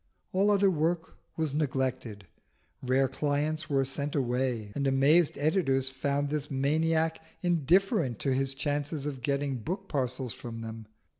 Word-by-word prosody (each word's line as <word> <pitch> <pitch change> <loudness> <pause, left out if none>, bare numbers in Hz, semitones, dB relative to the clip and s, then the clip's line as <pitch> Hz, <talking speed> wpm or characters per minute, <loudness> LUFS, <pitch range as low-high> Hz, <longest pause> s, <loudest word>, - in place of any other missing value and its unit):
All 195 +2 +3
other 200 -1 +4
work 165 +1 -1 0.2
was 160 -3 -1
neglected: 130 -8 -2 0.6
rare 130 +1 +2
clients 150 +3 -1
were 135 -2 +2
sent 140 +2 -3
away 125 -5 -1
and 140 -1 -1
amazed 145 +5 +4
editors 140 -4 +1
found 140 +2 -1
this 150 -1 -2
maniac 160 +4 +1 0.2
indifferent 175 - +2
to 135 - +1
his 135 +1 0
chance 145 +1 -1
of 140 -3 -4
getting 140 0 -1
book 190 - -4
parcels 130 -3 -2
from 115 -1 -7
them. 110 -1 -7
140 Hz, 140 wpm, -29 LUFS, 130-155 Hz, 0.6 s, other